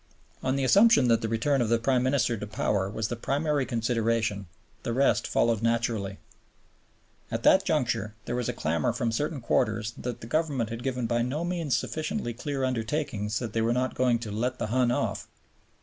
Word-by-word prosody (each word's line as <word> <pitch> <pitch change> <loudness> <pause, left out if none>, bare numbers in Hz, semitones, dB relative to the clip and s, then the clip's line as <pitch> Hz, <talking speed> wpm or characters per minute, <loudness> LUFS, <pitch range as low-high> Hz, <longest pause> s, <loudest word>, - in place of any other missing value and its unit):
On 130 0 0
the 140 - 0
assumption 200 - +5
that 115 - +4
the 115 - -1
return 125 +5 +1
of 115 - 0
the 115 - +4
Prime 125 +2 +1
Minister 125 -2 +1
to 105 -1 -6
power 100 -2 0
was 110 +1 -3
the 120 - -2
primary 140 +3 0
consideration, 115 -4 0 0.3
the 115 - -3
rest 135 +3 +2
followed 115 -2 +1
naturally. 115 -4 0 1.1
At 115 +1 -3
that 190 +1 +5
juncture 120 - 0
there 120 - -3
was 125 -1 -1
a - - -1
clamor 80 0 0
from 120 -1 -1
certain 145 +4 -2
quarters 115 -1 0
that 125 -1 -5
the - - -7
Government 135 -4 -1
had 115 +1 -5
given 125 -2 -2
by 120 +1 +1
no 140 +8 -2
means 170 -6 0
sufficiently 155 -6 -3
clear 135 +2 -3
undertakings 115 -4 -1
that 115 -3 -4
they 115 - +1
were 115 +1 +2
not 130 +1 0
going 125 -2 +2
"to 115 -2 -6
let 125 +5 -1
the - - -2
Hun 125 -1 +3
off." 120 - -1
120 Hz, 195 wpm, -27 LUFS, 115-135 Hz, 1.1 s, assumption